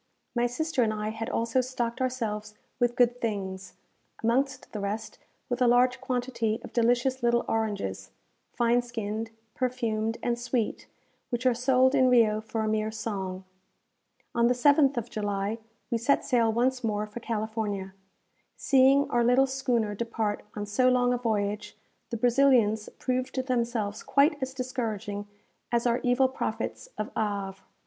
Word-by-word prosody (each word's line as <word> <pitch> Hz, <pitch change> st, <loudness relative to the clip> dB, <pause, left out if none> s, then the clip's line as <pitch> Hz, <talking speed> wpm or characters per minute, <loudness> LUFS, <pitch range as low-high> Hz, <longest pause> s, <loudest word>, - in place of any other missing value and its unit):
My 240 Hz, 0 st, +2 dB
sister 310 Hz, +3 st, -1 dB
and 225 Hz, -2 st, +2 dB
I 215 Hz, 0 st, -3 dB
had 225 Hz, +1 st, -4 dB
also 230 Hz, +3 st, +1 dB
stocked 250 Hz, -1 st, -3 dB
ourselves 215 Hz, -5 st, -2 dB, 0.2 s
with 240 Hz, -1 st, +2 dB
good 245 Hz, 0 st, +3 dB
things; 190 Hz, -4 st, -3 dB, 0.5 s
amongst 260 Hz, +3 st, 0 dB
the 215 Hz, -, -3 dB
rest, 205 Hz, +2 st, -4 dB, 0.3 s
with 245 Hz, 0 st, -3 dB
a 250 Hz, -, +5 dB
large 250 Hz, +1 st, +4 dB
quantity 245 Hz, -4 st, -1 dB
of -, -, -10 dB
delicious 245 Hz, +2 st, +2 dB
little 235 Hz, 0 st, +2 dB
oranges, 210 Hz, -, -2 dB, 0.4 s
fine 240 Hz, +1 st, +2 dB
skinned, 225 Hz, -2 st, -4 dB, 0.2 s
perfumed, 230 Hz, -3 st, -1 dB
and 240 Hz, 0 st, 0 dB
sweet, 240 Hz, -2 st, -2 dB, 0.4 s
which 240 Hz, 0 st, -3 dB
are 255 Hz, -, +5 dB
sold 255 Hz, +2 st, +3 dB
in 260 Hz, -2 st, +4 dB
Rio 220 Hz, -3 st, +4 dB
for 220 Hz, +1 st, -3 dB
a -, -, -1 dB
mere 215 Hz, 0 st, 0 dB
song. 195 Hz, -4 st, -4 dB, 0.9 s
On 235 Hz, 0 st, +3 dB
the 250 Hz, -, +2 dB
7th 280 Hz, +1 st, +4 dB
of 235 Hz, -1 st, -2 dB
July 205 Hz, 0 st, -2 dB, 0.3 s
we 235 Hz, -, +1 dB
set 265 Hz, +5 st, +2 dB
sail 235 Hz, -3 st, +3 dB
once 250 Hz, +3 st, +1 dB
more 210 Hz, -1 st, 0 dB
for 215 Hz, +2 st, -8 dB
California. 215 Hz, -4 st, -3 dB, 0.6 s
Seeing 275 Hz, +1 st, +4 dB
our 240 Hz, 0 st, +3 dB
little 250 Hz, +3 st, +5 dB
schooner 250 Hz, -5 st, 0 dB
depart 220 Hz, -1 st, -2 dB
on 205 Hz, -1 st, -3 dB
so 250 Hz, +5 st, +3 dB
long 250 Hz, -1 st, +3 dB
a -, -, +1 dB
voyage, 210 Hz, -2 st, -2 dB, 0.3 s
the 235 Hz, -, -3 dB
Brazilians 240 Hz, -3 st, +3 dB
proved 255 Hz, 0 st, -2 dB
themselves 235 Hz, -5 st, -1 dB
quite 285 Hz, +1 st, +2 dB
as 260 Hz, 0 st, -3 dB
discouraging 225 Hz, -5 st, -3 dB, 0.4 s
as 235 Hz, 0 st, +1 dB
our 240 Hz, 0 st, +2 dB
evil 250 Hz, +2 st, +3 dB
prophets 265 Hz, -, -4 dB
of 215 Hz, -, -3 dB
Havre. 200 Hz, -3 st, -2 dB
235 Hz, 155 wpm, -28 LUFS, 215-255 Hz, 0.9 s, a